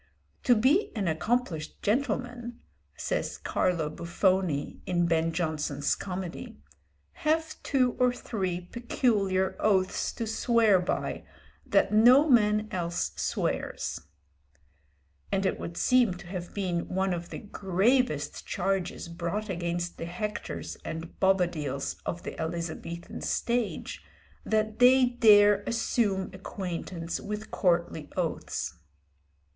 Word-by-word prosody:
"To 245 - +6
be 270 - +3
an 200 -4 -1
accomplished 170 0 -1
gentleman," 240 +1 -1 0.4
says - - -2
Carlo 170 -4 0
Buffone, 170 -1 0
in 175 -1 +2
Ben 165 0 +2
Jonson's 155 -4 -1
comedy, 180 - -6 0.6
"have 315 +1 0
two 255 -3 +2
or 250 -1 +4
three 190 -7 -3
peculiar 195 -2 0
oaths 190 -3 +2
to 230 - -3
swear 225 -2 +3
by 180 - -2 0.4
that - - +3
no 250 +8 +7
man 215 -5 +4
else 175 -3 -1
swears"; - - -2 1.3
and 195 0 +1
it - - 0
would 170 - -6
seem 245 -7 +3
to 180 +1 -11
have 175 -1 -6
been 180 -4 -2
one 190 0 0
of 170 0 -5
the - - -6
gravest 195 - 0
charges 195 -3 -1
brought 170 +5 -3
against 175 -1 -3
the 165 - -3
Hectors 210 +5 -5
and 165 +1 -7
Bobadils 175 -8 +1
of 170 - -3
the - - -6
Elizabethan 170 +1 -5
stage, 235 -2 -2 0.4
that 215 0 0
they 255 +1 +7
dare 210 -4 +6
assume 215 -4 0
acquaintance 180 -3 -5
with 210 +1 -5
courtly 170 -4 0
oaths. 165 - -2
190 Hz, 115 wpm, -28 LUFS, 170-225 Hz, 1.3 s, no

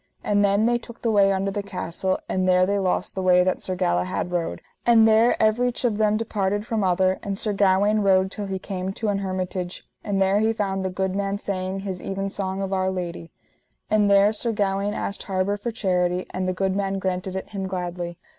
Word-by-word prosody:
And 205 0 +2
then 200 +2 +3
they 240 0 +2
took 235 0 -13
the 230 - +2
way 200 -2 +4
under 195 +1 0
the 205 +1 -2
castle, 185 -1 -2
and 185 0 0
there 180 0 +5
they 200 +1 0
lost 185 -2 -1
the 190 - -3
way 180 -1 +5
that 185 0 0
Sir 185 - -3
Galahad 90 - -1
rode, 175 -2 -2 0.2
and 230 -2 +6
there 225 +2 +5
everych 235 +4 +1
of 220 -3 0
them 215 0 +3
departed 205 -2 -1
from 225 -3 -1
other; 185 0 +2
and 200 -1 -4
Sir 210 0 -1
Gawaine 200 +2 +3
rode 190 -2 +3
till 205 0 -4
he 190 0 -3
came 190 0 -4
to 220 +1 -2
an 200 -1 0
hermitage, 185 -1 -4 0.2
and 200 -2 -1
there 195 +1 +3
he 220 +1 +2
found 195 -3 -2
the 190 - -1
good 190 +1 -2
man 200 0 -1
saying 190 -1 -2
his 190 -2 -5
evensong 195 0 -3
of 195 0 -3
Our 190 0 +1
Lady; 175 -2 -5 0.6
and 210 -1 +3
there 200 +1 +5
Sir 230 +2 -1
Gawaine 200 0 -1
asked 200 - -3
harbour 190 +1 0
for 205 +4 -4
charity, 180 -4 0
and 185 0 -2
the 185 - 0
good 190 +1 -1
man 195 -1 -1
granted 185 0 -3
it 190 - -5
him 195 -2 -3
gladly. 175 -2 -4
195 Hz, 215 wpm, -24 LUFS, 185-205 Hz, 0.6 s, and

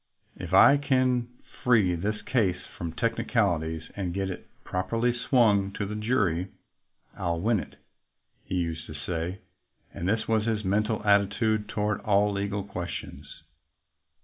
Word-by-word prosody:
"If - - -7
I 145 - +7
can 130 -3 +1 0.4
free 110 -8 +4
this 105 +5 -2
case 100 -8 +1 0.2
from 85 -1 -4
technicalities 100 -9 0
and 95 -3 -3
get 95 -1 -1
it 90 - -8 0.2
properly 115 +7 0
swung 115 -5 +3
to 100 - -3
the 105 - -5
jury, 105 -6 0 0.7
I'll 85 -1 -2
win 110 +3 +2
it," - - -9 0.7
he - - -4
used 85 -3 -2
to 75 - -8
say; 85 +4 -4 0.5
and 85 - -3
this 110 +1 0
was 110 -1 +1
his 110 -2 -1
mental 105 +3 0
attitude 105 +1 +2
toward 105 -1 -1
all 105 0 +3
legal 100 0 -2
questions. 80 -6 -7
100 Hz, 140 wpm, -27 LUFS, 90-110 Hz, 0.7 s, I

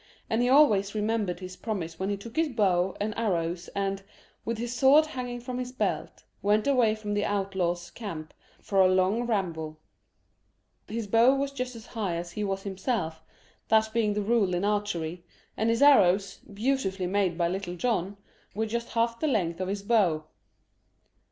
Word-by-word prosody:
And 225 +2 +2
he 245 - +2
always 220 -8 +4
remembered 210 -4 -1
his 185 0 -7
promise 175 -8 -4
when 190 +1 -1
he 200 - -1
took 225 +3 -11
his 320 -1 +2
bow 190 -6 +1
and 210 +1 -1
arrows 175 -5 -1
and, 195 0 -1 0.4
with 230 0 -3
his 235 +1 -3
sword 280 +5 +6
hanging 250 -5 -5
from 250 +1 -5
his 250 0 -4
belt, 255 - -3 0.2
went 210 +1 +2
away 245 -6 +3
from 210 -1 -4
the 205 0 0
outlaws' 185 -4 -1
camp 165 -9 -7 0.3
for 195 -1 +1
a 185 - +6
long 190 +6 +2
ramble. 165 -8 -2 1.1
His 225 +1 -3
bow 230 +6 +5
was 275 0 -1
just 255 -2 -4
as 225 - -10
high 200 -7 -3
as 170 +1 -5
he 210 - -3
was 195 -1 -2
himself, 190 -5 -2 0.5
that 220 0 +3
being 215 -3 +1
the 210 - 0
rule 205 -4 +2
in 180 +3 0
archery, 180 -5 -2 0.3
and 220 +2 0
his 230 +4 +2
arrows, 200 -8 +5
beautifully 200 -4 -1
made 185 -2 0
by 170 -1 +2
Little 180 0 -3
John, 200 -1 -1 0.4
were 220 +2 0
just 235 +2 -3
half 230 0 +1
the 310 - 0
length 185 - 0
of 185 - -1
his 200 +1 -3
bow. 195 -8 +2
205 Hz, 175 wpm, -28 LUFS, 185-230 Hz, 1.1 s, sword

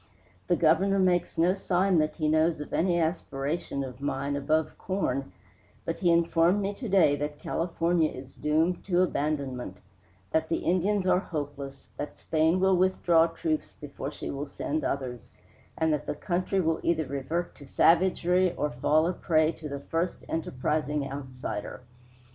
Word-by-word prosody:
The 175 - +3
Governor 175 +5 +3
makes 180 -2 +1
no 170 +3 +4
sign 190 -2 +2
that 155 0 0
he 155 -2 -1
knows 155 +1 +2
of 150 - -7
any 175 0 +2
aspiration 150 -3 -2
of 130 0 -8
mine 140 0 -2
above 155 +3 0
corn, 140 - -2 0.5
but 165 - -3
he 175 - +2
informed 170 +2 +3
me 200 0 -1
to 230 +2 -6
day 185 -7 +5
that 145 +1 -4
California 165 0 0
is 130 +1 -10
doomed 160 +4 0
to 180 -1 +3
abandonment, 140 - -2 0.5
that 160 0 +1
the - - -1
Indians 185 +3 +1
are 180 -1 +4
hopeless, 145 -5 -6
that 145 - -5
Spain 160 +3 +1
will 190 0 +4
withdraw 175 -3 +4
troops 160 -2 -3
before 140 -1 -7
she - - -6
will 140 +1 -4
send 155 +2 -3
others, 125 -4 -3 0.5
and 160 -1 +2
that 150 - -3
the - - -2
country 185 +4 -1
will 165 -3 +1
either 160 -2 +1
revert 140 +6 -3
to 140 - -14
savagery 180 +3 +3
or 150 - -1
fall 150 +6 +2
a 180 - 0
prey 160 -2 +2
to 155 -2 -8
the 140 0 -5
first 165 +4 -2
enterprising 150 -1 -1
outsider. 130 -7 -6
160 Hz, 160 wpm, -28 LUFS, 145-175 Hz, 0.5 s, day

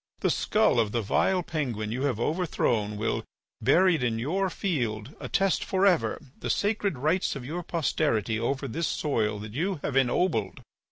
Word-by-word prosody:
The - - +2
skull - - +2
of 110 -2 +1
the 115 -2 0
vile 180 - +2
Penguin 125 -11 -3
you 125 +3 -2
have 130 -6 0
overthrown 120 - 0
will, 110 - -1 0.4
buried 165 - +4
in 120 -2 0
your 185 +11 0
field, 125 - -2
attest 195 -1 +1
for 190 +1 +1
ever 140 - +2 0.2
the - - -4
sacred 205 - 0
rights 155 +8 +1
of 130 -3 -6
your 165 +6 -4
posterity 145 - 0
over 135 +4 -1
this 165 +7 -2
soil 110 -8 0
that 105 0 -8
you 180 +9 -1
have 140 - -2
ennobled. 135 +7 +1
140 Hz, 165 wpm, -27 LUFS, 115-175 Hz, 0.4 s, buried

